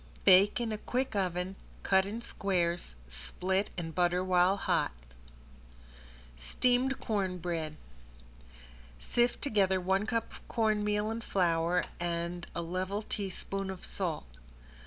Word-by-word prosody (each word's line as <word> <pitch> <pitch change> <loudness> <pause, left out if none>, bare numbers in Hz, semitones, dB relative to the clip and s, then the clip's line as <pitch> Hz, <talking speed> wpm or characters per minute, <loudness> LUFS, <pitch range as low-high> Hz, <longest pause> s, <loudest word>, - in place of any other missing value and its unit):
Bake 195 +5 +7
in 235 -2 -1
a 215 - -3
quick 255 0 -1
oven, 185 -1 -1 0.3
cut 190 0 +4
in 225 +3 -5
squares, 175 - -1
split 180 - -1
and 165 -2 -4
butter 180 +1 +2
while 185 +1 +4
hot. - - +1 1.5
~STEAMED 250 - +1
CORN 195 -5 -1
BREAD~ 160 -3 -3 1.2
Sift 240 - +1
together 195 -8 +3
one 190 +3 +1
cup 230 0 -1
cornmeal 210 -2 +1
and 230 +1 -4
flour 175 -2 +2 0.2
and 170 0 -2
a 170 - -1
level 185 +5 -2
teaspoon 195 -1 -4
of 190 -1 -6
salt. 170 - -2
190 Hz, 115 wpm, -31 LUFS, 175-210 Hz, 1.5 s, Bake